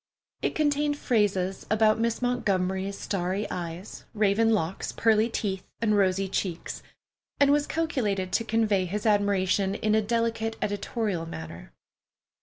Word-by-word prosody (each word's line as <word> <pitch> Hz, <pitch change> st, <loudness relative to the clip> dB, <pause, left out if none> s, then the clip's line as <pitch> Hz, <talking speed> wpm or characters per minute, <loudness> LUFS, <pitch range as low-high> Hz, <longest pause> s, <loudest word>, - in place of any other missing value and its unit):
It -, -, -1 dB
contained 290 Hz, -1 st, +1 dB
phases 195 Hz, -7 st, 0 dB
about 215 Hz, 0 st, +3 dB
Miss 230 Hz, +1 st, 0 dB
Montgomery's 195 Hz, -5 st, 0 dB
starry 190 Hz, +2 st, -2 dB
eyes, 175 Hz, +2 st, -6 dB
raven 215 Hz, +2 st, +3 dB
locks, 195 Hz, -5 st, -1 dB
pearly 220 Hz, 0 st, +3 dB
teeth, 195 Hz, -4 st, -2 dB, 0.2 s
and 215 Hz, -2 st, +2 dB
rosy 195 Hz, -1 st, +2 dB
cheeks, 180 Hz, -2 st, -3 dB, 0.6 s
and 280 Hz, 0 st, +5 dB
was 290 Hz, 0 st, +2 dB
calculated 210 Hz, -, -1 dB
to 230 Hz, -, +1 dB
convey 215 Hz, -4 st, +1 dB
his 205 Hz, +4 st, -4 dB
admiration 200 Hz, -2 st, +2 dB
in 215 Hz, 0 st, 0 dB
a 220 Hz, -, +4 dB
delicate 225 Hz, 0 st, -1 dB
editorial 205 Hz, -3 st, -2 dB
manner. 80 Hz, -, -8 dB
205 Hz, 130 wpm, -27 LUFS, 190-225 Hz, 0.6 s, and